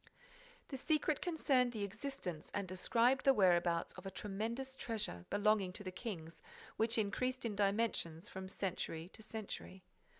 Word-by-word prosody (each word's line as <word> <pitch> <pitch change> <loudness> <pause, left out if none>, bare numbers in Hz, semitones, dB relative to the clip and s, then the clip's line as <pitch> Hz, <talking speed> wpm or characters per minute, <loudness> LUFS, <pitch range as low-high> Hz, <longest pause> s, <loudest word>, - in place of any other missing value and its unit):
This 270 -2 -5
secret 310 -1 +2
concerned 270 -8 +2
the 215 -3 -2
existence 200 - -4
and 200 -2 -1
described 230 +8 +3
the 270 -1 +6
whereabouts 175 -4 +4
of - - -8
a - - -1
tremendous 225 +7 -3
treasure, 210 - -3
belonging 205 -2 +3
to 205 - -5
the 185 - -4
kings, 170 -6 -6 0.3
which 225 +1 +3
increased 250 +5 0
in 215 -3 -1
dimensions 200 -4 +1
from 190 0 -6
century 180 -3 -3
to 220 - -10
century. 210 -3 -6
210 Hz, 145 wpm, -37 LUFS, 185-245 Hz, 0.3 s, the